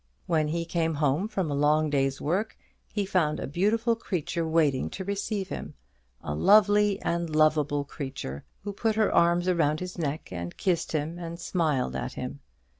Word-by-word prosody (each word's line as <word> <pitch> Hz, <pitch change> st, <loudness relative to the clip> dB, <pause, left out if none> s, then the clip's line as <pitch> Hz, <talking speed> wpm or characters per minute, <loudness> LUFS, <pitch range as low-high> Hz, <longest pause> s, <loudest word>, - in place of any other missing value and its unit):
When 155 Hz, -3 st, +1 dB
he 170 Hz, +2 st, -2 dB
came 165 Hz, -1 st, 0 dB
home 150 Hz, +6 st, +1 dB
from 190 Hz, -8 st, -2 dB
a -, -, 0 dB
long 150 Hz, +2 st, +2 dB
day's 135 Hz, -1 st, +1 dB
work, 190 Hz, +9 st, -1 dB, 0.3 s
he 205 Hz, -2 st, -1 dB
found 170 Hz, -6 st, +1 dB
a -, -, -3 dB
beautiful 215 Hz, -, +1 dB
creature 170 Hz, -6 st, -2 dB
waiting 155 Hz, -5 st, +2 dB
to 190 Hz, -, -6 dB
receive 200 Hz, 0 st, -2 dB
him -, -, -6 dB, 0.5 s
a 75 Hz, -, -3 dB
lovely 205 Hz, -, +5 dB
and 170 Hz, 0 st, -1 dB
lovable 155 Hz, -2 st, +2 dB
creature, 135 Hz, -, -6 dB, 0.2 s
who 205 Hz, 0 st, -4 dB
put 220 Hz, +2 st, 0 dB
her 220 Hz, -1 st, +2 dB
arms 170 Hz, +1 st, +3 dB
around 155 Hz, -4 st, +2 dB
his 180 Hz, -1 st, -6 dB
neck 150 Hz, -1 st, -3 dB
and 85 Hz, -1 st, -5 dB
kissed 175 Hz, -4 st, 0 dB
him, 160 Hz, +3 st, -2 dB
and 170 Hz, 0 st, -6 dB
smiled 155 Hz, -10 st, 0 dB
at 125 Hz, -, -3 dB
him. 125 Hz, +3 st, -6 dB
165 Hz, 175 wpm, -27 LUFS, 145-190 Hz, 0.5 s, lovely